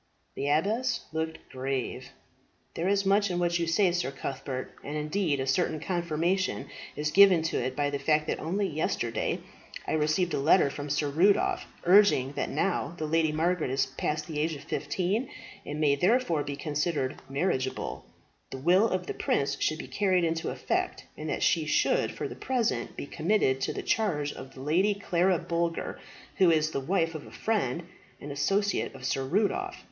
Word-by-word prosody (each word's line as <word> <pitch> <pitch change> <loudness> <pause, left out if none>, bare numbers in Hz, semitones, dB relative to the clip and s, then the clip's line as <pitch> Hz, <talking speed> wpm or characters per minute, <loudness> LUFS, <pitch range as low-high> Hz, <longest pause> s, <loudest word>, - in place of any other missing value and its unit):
The 140 - -3
abbess 215 - +1
looked 160 0 -4
grave. 130 -1 -3 0.6
"There 170 - -2
is 200 0 +2
much 200 +1 +3
in 175 - -1
what 175 -1 +1
you 170 - 0
say, 180 +2 +3
Sir 175 -5 -1
Cuthbert; 135 -1 -5
and 150 +2 -4
indeed 150 0 0
a 130 - -1
certain 155 +3 +1
confirmation 175 +2 -1 0.3
is 150 0 -1
given 190 -3 +7
to 160 - -1
it 130 +1 -3
by 145 -1 0
the 140 - -2
fact 150 +2 +2
that - - -2
only 195 +6 -1
yesterday 150 -8 -1 0.4
I - - -3
received 155 +3 +1
a - - 0
letter 145 +1 +4
from 145 +1 -6
Sir 145 +1 0
Rudolph, 190 +7 +3 0.2
urging 180 -8 +5
that - - -2
now 175 -4 -1
the 155 - -3
Lady 160 0 +2
Margaret 165 0 0
is 135 +1 +1
past 150 +3 -3
the 155 -4 -4
age 160 +1 0
of 140 - -10
fifteen, 195 - -1 0.4
and 150 +1 -4
may 150 -2 +4
therefore 180 - +2
be 140 - -4
considered 145 -2 -1
marriageable, 135 -3 -1 0.5
the 135 - -6
will 180 +10 +4
of 185 -1 -1
the - - -4
prince 140 - 0
should 155 - +1
be - - -7
carried 185 -3 +1
into 165 0 0
effect, - - -2
and - - -6
that - - -1
she - - +2
should - - +2
for - - -4
the - - -7
present 230 - -1
be - - -4
committed 155 -5 +1
to - - 0
the - - -5
charge 150 -10 0
of 130 0 -10
the 130 - -9
Lady 180 +9 +2
Clara 185 -2 +2
Boulger, 170 0 -2 0.4
who 190 -4 +5
is 155 -1 +2
the 140 - -1
wife 165 +3 0
of 155 - -7
a - - -13
friend 180 - -1 0.4
and 145 - -7
associate 195 +6 0
of 130 -1 -8
Sir 135 +1 0
Rudolph. 215 - 0
160 Hz, 185 wpm, -28 LUFS, 145-185 Hz, 0.6 s, given